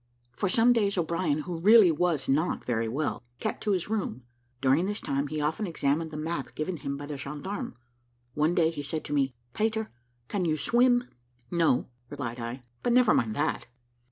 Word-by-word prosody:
For 190 +11 -1
some 235 +5 +5
days 200 -4 +1
O'Brien, 165 -3 0
who 170 0 -5
really 210 0 +7
was 160 -3 0
not 155 +6 +1
very 115 -2 0
well, 140 +1 -2 0.2
kept - - -3
to 210 - +2
his 185 -4 0
room. 195 - -2 0.4
During 135 +8 +3
this 205 0 -2
time, 140 +1 -1
he 155 +1 -3
often 155 +8 -1
examined 160 0 0
the 155 - -7
map 155 -4 -4
given 165 +3 -2
him 140 0 -4
by 145 - -6
the 145 -1 -5
gendarme. 150 +9 -5 0.6
One 155 +4 +1
day 165 -1 +3
he 150 -3 -5
said 150 +2 -4
to 145 - -4
me, 135 -3 +1 0.2
"Peter, 220 0 -1 0.4
can 195 +4 -1
you 155 -2 +1
swim?" 245 - +4 0.5
"No," 165 -7 +2 0.2
replied 125 -4 -5
I; 120 +2 -5 0.2
"but 240 - +1
never 245 -3 +5
mind 110 -2 +1
that." 150 +2 -1
155 Hz, 185 wpm, -28 LUFS, 140-190 Hz, 0.6 s, really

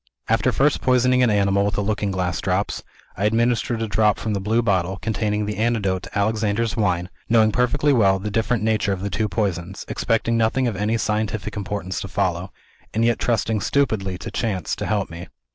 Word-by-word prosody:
"After 115 +3 +2
first 145 +4 +2
poisoning 125 0 +3
an 125 - +4
animal 100 -1 +2
with 100 -1 0
the 105 - -1
Looking 105 0 -1
Glass 90 -3 -2
Drops, 95 +2 -1 0.3
I 100 - -1
administered 115 +1 +1
a - - -2
dose 105 +1 +2
from 110 - -3
the 100 - -1
blue 110 +4 +1
bottle, 95 -3 0
containing 105 -1 -1
the 105 0 -4
antidote 105 -5 0
to - - -7
Alexander's 110 +2 0
Wine 90 -5 0 0.2
knowing 110 -2 +4
perfectly 135 +5 +2
well 100 -6 +4
the 105 +2 -5
different 115 +1 0
nature 110 -3 +1
of 95 - -5
the 100 - -3
two 105 +5 0
poisons; 95 -3 -2
expecting 115 0 0
nothing 115 +3 +2
of 115 - -2
any 105 +3 0
scientific 110 -2 -2
importance 100 -2 -4
to - - -5
follow; 95 -1 -1 0.4
and 115 +1 +2
yet 115 -1 +2
trusting 110 -2 0
stupidly 100 -10 0
to - - -7
chance 100 -7 -2
to - - -3
help 100 -5 -1
me. 85 +2 -8
105 Hz, 195 wpm, -22 LUFS, 95-115 Hz, 0.4 s, an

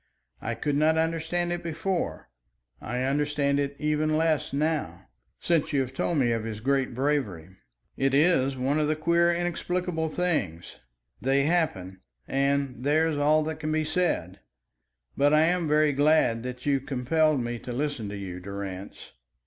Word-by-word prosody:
I - - -3
could 145 -1 -1
not 155 +2 +3
understand 165 +2 0
it 175 - -4
before; 165 - -3 0.5
I 125 +2 -3
understand 140 +1 +1
it 140 0 -2
even 155 +1 +1
less 160 -3 +1
now 140 - -2 0.3
since 165 -3 0
you 140 - +3
have 130 0 -4
told 165 +4 -1
me 125 -4 +2
of 115 -1 -1
his 110 -1 -5
great 135 +1 0
bravery. 125 - -1 0.5
It 135 0 +1
is 140 -4 +3
one 135 +4 +1
of 150 - +1
the 155 - +1
queer 170 +2 +3
inexplicable 175 -1 -2
things. 150 - -2 0.4
They 135 +2 +2
happen, 140 - -1 0.3
and 140 -2 0
there's 155 +2 +2
all 155 +2 +3
that 155 0 -4
can 155 0 -3
be 155 0 +1
said. 155 - -1 0.8
But 145 +2 +4
I 155 - +5
am 170 +1 +2
very 150 0 +3
glad 145 -5 +3
that 125 +1 -7
you 140 -2 +2
compelled 145 +3 +1
me 120 -1 -3
to 125 - -7
listen 130 -4 -2
to 100 - -6
you, 95 -2 -6
Durrance." 100 0 -7
145 Hz, 160 wpm, -27 LUFS, 125-160 Hz, 0.8 s, I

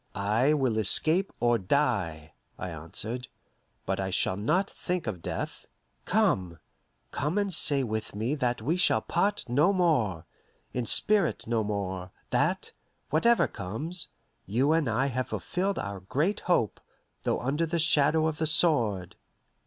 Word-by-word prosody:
"I 110 +8 +2
will 130 -6 +1
escape 160 - +4
or 120 -1 +2
die," 95 - -1 0.2
I 90 - -5
answered; 110 +10 -3 0.6
"but - - -1
I 95 0 -1
shall 95 0 +1
not 155 - +1
think 180 -2 -4
of 100 -7 -4
death. - - -5 0.4
Come 105 - +1 0.5
come 150 +7 -2
and 200 -2 +1
say 140 -3 +2
with 110 -3 -4
me 115 +6 -1
that 125 -6 -1
we 160 +8 +1
shall 180 - +2
part 205 -7 0
no 145 +10 +3
more 145 - +1 0.5
in 125 -2 -2
spirit 205 - +2
no 115 -1 0
more; 95 -3 -3 0.2
that, - - 0 0.4
whatever 235 +11 +4
comes, 145 - -4 0.4
you 125 +9 +2
and 160 -6 +2
I 120 +4 +1
have 130 -2 -2
fulfilled 190 +2 -2
our 100 -1 -4
great 150 - -1
hope, 120 - 0 0.4
though - - 0
under 145 +6 -1
the 170 +2 -1
shadow 155 0 +4
of 160 -2 -2
the 160 - +1
sword." 120 - +2
130 Hz, 145 wpm, -28 LUFS, 105-165 Hz, 0.6 s, escape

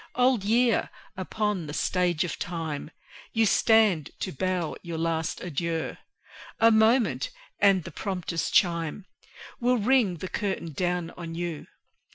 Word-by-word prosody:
Old 250 -4 +3
Year! 230 +2 +2 0.3
upon 190 -2 -2
the 150 - -5
Stage 180 -3 +1
of 175 - -4
Time 160 -4 -4 0.4
You 225 -1 +3
stand 215 -8 +4
to 185 - -2
bow 180 +1 -1
your 170 -2 -5
last 165 0 -1
adieu; 170 -1 -2 0.6
A 230 0 +6
moment, 225 - +3 0.3
and 195 -3 +4
the 170 - -8
prompter's 180 -1 -3
chime 170 0 +1 0.5
Will 245 +1 +2
ring 225 -5 +3
the 185 - -5
curtain 190 -5 -3
down 175 +2 -1
on 165 -2 -7
you. 170 -3 -4
180 Hz, 135 wpm, -27 LUFS, 165-220 Hz, 0.6 s, A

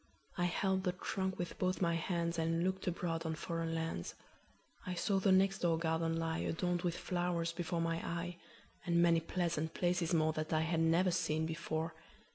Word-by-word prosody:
I 175 - +1
held 190 +2 +1
the 180 -2 +1
trunk 190 0 -2
with 175 - -4
both 185 0 +1
my 170 -2 +2
handsAnd 170 -1 0
looked 190 +1 -1
abroad 165 -2 -1
on 160 -1 -2
foreign 165 0 -2
lands.I 165 - -7
saw 195 +2 +1
the 190 0 +3
next 195 +1 +4
door 170 -2 +2
garden 165 0 0
lie, 165 0 -1
Adorned 175 +1 0
with 175 -2 -1
flowers, 175 -2 -1
before 170 0 -2
my 165 0 0
eye, 170 +1 -3 0.5
And 170 -1 +2
many 170 -1 +5
pleasant 165 -1 -2
places 175 -1 +1
moreThat 155 -1 +1
I 155 - +3
had 165 0 0
never 165 +3 +4
seen 160 -2 0
before. 160 0 -2
170 Hz, 170 wpm, -35 LUFS, 165-180 Hz, 0.5 s, many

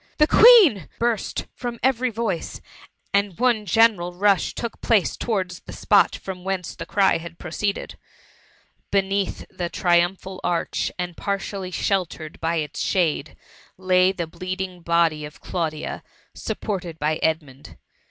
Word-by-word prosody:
the 300 - +6
Queen 445 - +8
T - - -11
burst 235 -3 -1
from 240 -2 -5
every 255 -1 +2
voice, 220 -6 -3 0.5
and 200 -3 +1
one 235 -4 +2
general 185 -3 +3
rush 195 -2 +2
took 235 -1 -5
place 215 -6 +2
towards 185 -6 -2
the - - -11
spot - - +3
from 185 -2 -7
whence 190 -2 -3
the - - -7
cry 195 -5 +3
had 170 0 -10
proceeded. 200 +4 -4 0.9
Beneath 195 0 0
the 175 -1 -4
triumphal 180 +2 0
arch, 170 -1 -1
and 180 -1 -4
partially 195 -1 -3
dieltered 180 -4 -2
by 165 +1 -1
its 150 -3 -3
shade, 155 -5 0 0.4
lay 185 0 +3
the 175 -3 -4
bleeding 185 +2 -5
body 165 -2 +2
of 150 0 -9
Claudia, 160 -4 -3 0.3
supported 180 -6 -4
by 155 0 0
Edmund. 150 -4 -3
185 Hz, 135 wpm, -23 LUFS, 170-200 Hz, 0.9 s, Queen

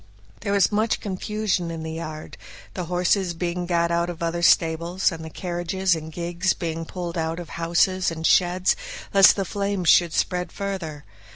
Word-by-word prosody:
There 200 - -2
was 200 +1 +3
much 215 +2 +1
confusion 200 -2 -2
in 165 -1 -5
the 160 - -5
yard; 155 -1 -7 0.4
the 180 - -4
horses 180 +1 +1
being 175 +1 -3
got 170 -1 +1
out 170 +1 +1
of 170 0 -6
other 170 +1 -1
stables, 170 +3 +3
and 165 -2 -7
the 160 - -7
carriages 175 +2 -1
and 160 0 -7
gigs 175 +2 -1
being 165 -1 -4
pulled 175 0 -5
out 165 +1 -2
of 175 - -8
houses 175 +2 +1
and 165 -1 -5
sheds, 180 +1 +3 0.4
lest 195 -1 +8
the 195 - -1
flames 200 -2 -1
should 170 -2 +5
spread 180 0 -1
further. 185 -7 -5
175 Hz, 175 wpm, -24 LUFS, 165-185 Hz, 0.4 s, lest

